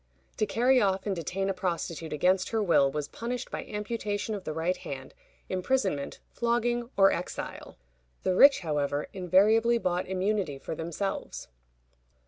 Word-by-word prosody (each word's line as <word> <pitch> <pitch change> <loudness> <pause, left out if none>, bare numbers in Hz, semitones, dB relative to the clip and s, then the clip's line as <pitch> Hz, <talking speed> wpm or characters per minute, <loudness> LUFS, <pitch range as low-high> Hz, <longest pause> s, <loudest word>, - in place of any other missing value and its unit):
To 215 - +1
carry 250 +2 +3
off 195 -2 +1
and 200 -2 -1
detain 185 +3 -2
a 195 - +1
prostitute 170 -3 -3
against 185 +5 +2
her 225 -2 0
will 145 -7 +4
was 150 0 -3
punished 245 +6 -5
by - - -4
amputation 210 0 -3
of 200 -3 -6
the - - -2
right 165 +4 -1
hand, 130 -1 -7 0.3
imprisonment, 185 - -1
flogging, 240 0 0
or 195 0 +7
exile. 180 - -5 0.5
The 185 - +2
rich, 275 +6 +7
however, 145 -3 -1
invariably 210 +6 +4
bought 180 -5 -1
immunity 190 -5 -1
for 135 - -6
themselves. 170 - -4
190 Hz, 145 wpm, -28 LUFS, 170-220 Hz, 0.5 s, or